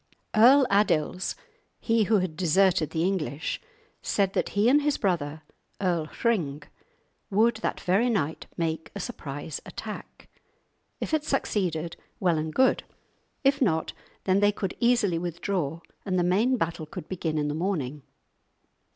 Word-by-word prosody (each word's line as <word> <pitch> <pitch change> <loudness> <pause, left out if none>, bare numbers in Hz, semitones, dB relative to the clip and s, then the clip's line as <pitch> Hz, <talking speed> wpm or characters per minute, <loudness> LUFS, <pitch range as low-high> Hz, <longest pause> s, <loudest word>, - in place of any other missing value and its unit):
Earl 260 +5 +7
Adils, 185 -3 +1 0.4
he 225 -2 +2
who 215 +2 +4
had 185 -4 -1
deserted 180 -1 +3
the 160 - -1
English, 170 -5 -2 0.4
said 195 -2 +1
that - - 0
he 210 +3 +4
and 285 +4 +5
his 295 0 +1
brother, 160 -6 -1 0.4
Earl 175 -5 0
Hring, 160 - -1 0.7
would 220 +3 +3
that 225 - -2
very 200 +7 +2
night 160 -9 -1
make 160 -2 -2
a - - -4
surprise 150 - -5
attack; - - -8 0.7
if - - -4
it 310 -1 +2
succeeded, 175 - -1 0.2
well 175 -4 +2
and 155 0 -3
good; 260 +9 +3 0.6
if 275 +1 +3
not, 160 -10 +1 0.3
then 190 +1 +3
they 205 0 +4
could 195 -2 -4
easily 235 -8 +3
withdraw, 170 -2 -2 0.2
and 185 -2 -1
the 175 - +3
main 215 +9 +3
battle 165 -5 -2
could 155 - -8
begin 165 -4 -2
in 150 -1 0
the 145 - -1
morning. 150 -5 -2
185 Hz, 145 wpm, -27 LUFS, 160-215 Hz, 0.7 s, Earl